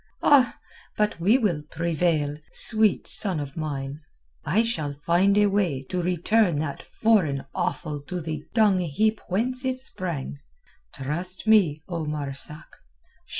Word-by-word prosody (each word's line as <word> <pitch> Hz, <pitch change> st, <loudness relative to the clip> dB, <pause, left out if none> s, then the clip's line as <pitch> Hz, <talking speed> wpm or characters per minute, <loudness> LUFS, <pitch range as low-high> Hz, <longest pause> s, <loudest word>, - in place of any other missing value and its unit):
Ah! 270 Hz, -4 st, +5 dB, 0.4 s
but 210 Hz, -4 st, 0 dB
we 205 Hz, +9 st, +4 dB
will 190 Hz, -, 0 dB
prevail, 160 Hz, -1 st, 0 dB, 0.2 s
sweet 215 Hz, -3 st, +2 dB
son 190 Hz, -6 st, 0 dB
of 140 Hz, -1 st, -6 dB
mine. 145 Hz, -2 st, -4 dB, 0.4 s
I 210 Hz, +8 st, +2 dB
shall 155 Hz, -12 st, -2 dB
find 175 Hz, +7 st, +2 dB
a 210 Hz, -, +5 dB
way 190 Hz, -10 st, 0 dB
to 180 Hz, -, -1 dB
return 180 Hz, +1 st, +2 dB
that 145 Hz, -2 st, -3 dB
foreign 180 Hz, -12 st, +1 dB
offal 150 Hz, -4 st, -2 dB
to 180 Hz, -, -3 dB
the 155 Hz, -2 st, -5 dB
dung 210 Hz, -4 st, +4 dB
heap 210 Hz, +7 st, 0 dB
whence 250 Hz, +7 st, -1 dB
it 260 Hz, 0 st, -1 dB
sprang. 170 Hz, -, -4 dB, 0.5 s
Trust 170 Hz, +9 st, -3 dB
me, 180 Hz, -9 st, +4 dB
O 170 Hz, -3 st, -3 dB
Marzak! 150 Hz, 0 st, -3 dB
175 Hz, 135 wpm, -25 LUFS, 150-210 Hz, 0.5 s, Ah